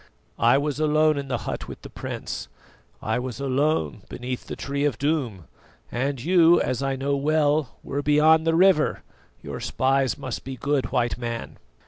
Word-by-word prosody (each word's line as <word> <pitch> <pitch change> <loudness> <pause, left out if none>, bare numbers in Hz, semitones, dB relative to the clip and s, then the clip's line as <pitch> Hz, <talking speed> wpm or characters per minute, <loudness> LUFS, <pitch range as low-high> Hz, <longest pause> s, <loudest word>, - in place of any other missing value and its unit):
I 120 +4 +5
was 145 0 -1
alone 155 0 +3
in 140 - -5
the 125 -2 -1
hut - - -4
with - - -10
the - - -9
prince, - - -5 0.6
I 110 +2 0
was 125 -1 -5
alone 140 - 0
beneath 125 0 -5
the - - -5
Tree 140 0 -3
of 145 -6 +1
Doom, 135 - -1 0.5
and 135 +2 -1
you, 170 +4 +5
as 130 0 -1
I 135 -1 0
know 140 +2 -1
well, 150 0 +1
were 140 +1 -3
beyond 155 +2 +4
the 165 - +3
river. 185 -3 +3 0.4
Your - - -6
spies 135 -1 +1
must - - -5
be 135 0 -6
good, 140 +1 -1
White 120 0 0
Man." 115 -1 -5
140 Hz, 170 wpm, -24 LUFS, 130-155 Hz, 0.6 s, I